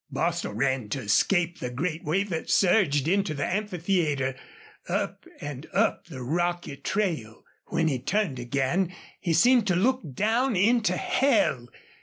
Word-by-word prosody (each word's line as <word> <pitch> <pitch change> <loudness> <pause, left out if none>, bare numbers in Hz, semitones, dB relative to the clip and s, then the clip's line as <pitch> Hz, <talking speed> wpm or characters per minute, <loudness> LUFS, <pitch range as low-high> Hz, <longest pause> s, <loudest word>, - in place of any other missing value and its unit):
Bostil 170 +5 -1
ran 130 -5 0
to 135 +5 -3
escape 175 - +2
the 125 - -3
great 160 +6 -3
wave 195 +6 0
that 165 - -3
surged 170 -8 +3
into 195 -3 +1
the 140 - -1
amphitheater, 175 -9 0 0.6
up - - -2
and 145 0 -7
up - - +1
the 130 -6 -8
rocky 175 +2 -1
trail. 155 - -2 0.2
When 165 -1 0
he 135 -5 0
turned 170 - -1
again 140 +9 -1 0.2
he 170 -4 -1
seemed 240 +6 +5
to 180 - +2
look 255 +8 +2
down 230 - +1
into 220 +4 +3
hell. 270 - +1
170 Hz, 145 wpm, -26 LUFS, 140-195 Hz, 0.6 s, seemed